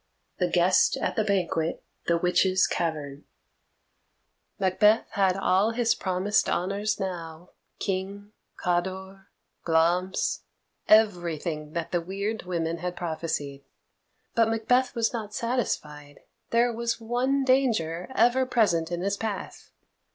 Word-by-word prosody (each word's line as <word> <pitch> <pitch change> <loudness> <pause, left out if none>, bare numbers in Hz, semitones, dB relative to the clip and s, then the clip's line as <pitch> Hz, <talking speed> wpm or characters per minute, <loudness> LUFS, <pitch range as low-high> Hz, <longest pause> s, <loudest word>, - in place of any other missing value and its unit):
The 180 - +2
Guest 180 +1 +3
at - - -2
the 220 - +1
Banquet 175 -5 -1 2.7
Macbeth 210 +3 +3
had 195 -2 +2
all 195 +3 +2
his 235 0 +2
promised 190 +2 0
honours 200 +4 -1
now 175 -3 -6 0.3
King, 200 +2 -4 0.3
Cawdor, 190 +2 -3 0.4
Glamis 175 +3 +1 0.5
everything 170 -7 +2
that 170 -1 -3
the 175 - +1
weird 200 +4 -4
women 165 -2 -2
had 180 +1 -4
prophesied. 155 -4 -3 0.7
But 230 -1 +3
Macbeth 245 +3 +1
was 230 0 +1
not 215 -3 -5
satisfied. 150 - -3 0.3
There 235 +1 +2
was 230 0 -2
one 250 +4 0
danger 220 -11 +1
ever 255 +2 +3
present 175 -9 +1
in 175 0 -2
his 200 +2 -1
path. 215 -2 -5
190 Hz, 105 wpm, -26 LUFS, 170-225 Hz, 2.7 s, Guest